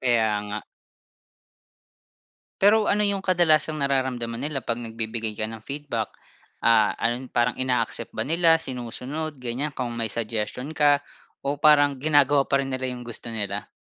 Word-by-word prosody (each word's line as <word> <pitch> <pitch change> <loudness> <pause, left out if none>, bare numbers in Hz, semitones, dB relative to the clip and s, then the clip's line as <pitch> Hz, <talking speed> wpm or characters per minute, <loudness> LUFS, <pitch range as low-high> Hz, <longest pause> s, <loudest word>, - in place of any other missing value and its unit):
Kaya 115 -4 +2 0.2
nga. 105 +1 -5 2.0
Pero 210 +2 +5
ano 210 0 +2
'yong 200 -1 -1
kadalasang 160 -4 +3
nararamdaman 130 -3 -1
nila 150 -2 -1
'pag 115 -2 -2
nagbibigay 115 -1 -3
ka 110 +1 -2
ng 110 0 -9
feedback? 140 -6 -4 0.5
Ah, 110 -2 +4
ano 120 +2 0
'yon, 130 - -12
parang 120 0 +1
ina-accept 130 -1 -1
ba - - -3
nila, 165 0 +4
sinusunod, 130 +4 -5
ganyan, 125 +5 -2
kung 125 -3 -4
may 115 -2 -2
suggestion 115 +6 -3
ka, 145 -1 +4 0.4
o 140 +1 -1
parang 145 -1 +5
ginagawa 145 0 +4
pa 140 - +1
rin 135 - -1
nila 130 0 -2
'yong 125 -1 -7
gusto 120 0 -6
nila? 100 -2 -3
130 Hz, 150 wpm, -25 LUFS, 115-150 Hz, 2.0 s, Pero